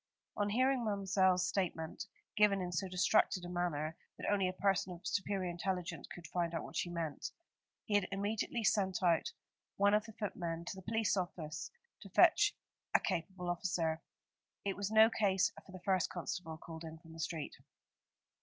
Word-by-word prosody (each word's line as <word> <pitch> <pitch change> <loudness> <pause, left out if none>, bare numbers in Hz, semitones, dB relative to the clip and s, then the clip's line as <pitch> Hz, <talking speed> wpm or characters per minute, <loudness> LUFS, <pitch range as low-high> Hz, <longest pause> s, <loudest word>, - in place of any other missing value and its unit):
On 205 0 +1
hearing 255 +3 +3
Ma'mselle's 190 -3 +3
statement, 180 -1 -2 0.3
given 210 -2 +5
in 180 -1 -2
so 185 +2 -1
distracted 185 0 +3
a - - -6
manner 165 -3 -1 0.2
that - - -5
only 195 -2 +3
a - - -4
person 190 -1 +1
of 175 - -12
superior 195 -2 0
intelligence 175 -3 -3
could 175 - -10
find 170 -1 -1
out 165 - -2
what - - -9
she 175 - 0
meant, 165 -4 -3 0.6
he 215 - -3
had 205 -2 +3
immediately 210 +3 -1
sent 195 -3 +2 0.8
one 200 +1 +5
of 210 0 +3
the 220 - -10
footmen 170 -5 -3
to 175 - -4
the 190 - -8
police 220 +2 +1
office, 170 -4 -3 0.3
to - - -10
fetch 410 0 +5 0.4
a - - +8
capable 180 +2 -2
officer. 170 -2 0 0.6
It 195 - 0
was 200 0 -2
no 220 0 +8
case 195 -4 +3
for - - -14
the 185 - -7
first 185 -3 +2
constable 165 -1 -4
called 165 0 -9
in 160 0 -7
from 165 0 -14
the 165 - -11
street. 160 -2 -3
185 Hz, 175 wpm, -35 LUFS, 170-200 Hz, 0.8 s, a